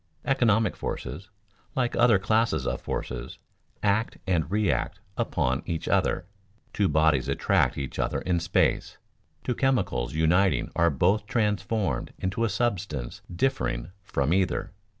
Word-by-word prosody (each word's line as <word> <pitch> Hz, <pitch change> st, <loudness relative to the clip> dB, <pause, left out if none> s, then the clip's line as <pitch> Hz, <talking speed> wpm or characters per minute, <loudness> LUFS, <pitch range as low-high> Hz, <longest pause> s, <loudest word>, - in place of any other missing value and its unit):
Economic 115 Hz, -6 st, +3 dB
forces, 90 Hz, +7 st, -5 dB, 0.5 s
like 125 Hz, -2 st, 0 dB
other 120 Hz, -3 st, +5 dB
classes 110 Hz, +4 st, +1 dB
of -, -, -2 dB
forces, 60 Hz, +1 st, -4 dB, 0.5 s
act 105 Hz, +2 st, +1 dB
and 85 Hz, -5 st, +1 dB
react 100 Hz, -, 0 dB, 0.2 s
upon 65 Hz, +3 st, 0 dB
each 80 Hz, -2 st, -3 dB
other. 90 Hz, -, +1 dB, 0.5 s
Two 100 Hz, -, +2 dB
bodies 75 Hz, -3 st, +3 dB
attract -, -, +2 dB
each 70 Hz, -1 st, -5 dB
other -, -, 0 dB
in 90 Hz, -2 st, +1 dB
space; 85 Hz, -4 st, +1 dB, 0.5 s
two 125 Hz, -, 0 dB
chemicals 120 Hz, -, 0 dB
uniting 90 Hz, +5 st, +2 dB
are 85 Hz, 0 st, +4 dB
both 95 Hz, +8 st, +1 dB
transformed 105 Hz, -3 st, 0 dB
into 95 Hz, +5 st, -2 dB
a 115 Hz, -, +2 dB
substance 95 Hz, -, -2 dB
differing 85 Hz, -, -1 dB
from 70 Hz, -4 st, 0 dB
either. 95 Hz, +1 st, 0 dB
95 Hz, 130 wpm, -27 LUFS, 80-110 Hz, 0.5 s, other